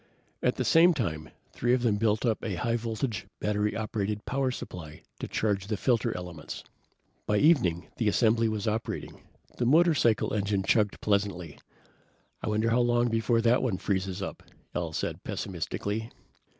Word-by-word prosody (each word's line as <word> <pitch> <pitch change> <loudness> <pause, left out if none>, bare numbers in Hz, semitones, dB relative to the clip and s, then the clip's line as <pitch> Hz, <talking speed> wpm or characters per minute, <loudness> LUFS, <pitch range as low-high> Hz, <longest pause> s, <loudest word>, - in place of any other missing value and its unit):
At - - +2
the - - -2
same 170 +1 +6
time, 80 - -2 0.2
three 120 +1 +2
of 125 - -2
them 110 -4 +2
built 110 +2 +1
up 115 -2 0
a 105 -5 -2
high 115 +6 0
voltage, 115 -2 -3
battery 105 0 0
operated 105 -1 -2
power 135 +1 0
supply 80 -10 -7 0.2
to - - -4
charge 100 -3 -1
the 105 -1 -1
filter 120 +2 +1
elements. 90 -3 -7 0.6
By 105 - +2
evening 110 - +3
the 115 - 0
assembly 115 +1 +3
was 110 -1 -2
operating. 110 +1 -3 0.4
The 120 - +2
motorcycle 150 -7 +4
engine 100 -2 0
chugged 105 0 +2
pleasantly. 100 -6 -1 0.8
"I - - -2
wonder 110 +2 +1
how 120 +2 +4
long 120 0 +2
before 115 +1 +2
that 120 +2 +3
one 115 -8 0
freezes 95 0 -2
up," - - -6 0.3
Al 85 -2 -2
said - - -3
pessimistically. 100 +5 -3
110 Hz, 160 wpm, -28 LUFS, 100-120 Hz, 0.8 s, same